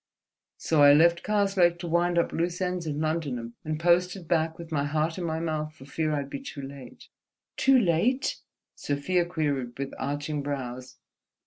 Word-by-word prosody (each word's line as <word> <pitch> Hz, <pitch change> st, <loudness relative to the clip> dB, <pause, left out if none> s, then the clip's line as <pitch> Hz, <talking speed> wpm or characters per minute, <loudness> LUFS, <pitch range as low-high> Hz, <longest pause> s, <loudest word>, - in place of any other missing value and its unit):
So 160 Hz, -2 st, +1 dB
I 145 Hz, 0 st, +9 dB
left 170 Hz, +3 st, +5 dB
Karslake 195 Hz, -4 st, +2 dB
to 175 Hz, -, -6 dB
wind 175 Hz, +1 st, +1 dB
up 170 Hz, -, +2 dB
loose 175 Hz, +1 st, -1 dB
ends 180 Hz, -2 st, -2 dB
in 150 Hz, -1 st, -2 dB
London, 145 Hz, -7 st, -2 dB
and 155 Hz, 0 st, -3 dB
posted 175 Hz, +1 st, +2 dB
back 160 Hz, -1 st, +1 dB
with 170 Hz, -1 st, -10 dB
my 145 Hz, -3 st, 0 dB
heart 155 Hz, +4 st, -1 dB
in -, -, -3 dB
my 160 Hz, -1 st, -2 dB
mouth 155 Hz, -2 st, -3 dB
for 135 Hz, -, -13 dB
fear 155 Hz, +2 st, -2 dB
I'd 145 Hz, -2 st, -1 dB
be 140 Hz, -, -6 dB
too 270 Hz, -, -8 dB
late." 135 Hz, -2 st, -11 dB, 0.5 s
"Too 270 Hz, -1 st, +5 dB
late?" 235 Hz, -, +1 dB, 0.4 s
Sofia 170 Hz, +5 st, -1 dB
queried 140 Hz, -8 st, -2 dB
with 140 Hz, 0 st, -4 dB
arching 145 Hz, +1 st, -2 dB
brows. 130 Hz, -3 st, -5 dB
160 Hz, 175 wpm, -27 LUFS, 145-175 Hz, 0.5 s, I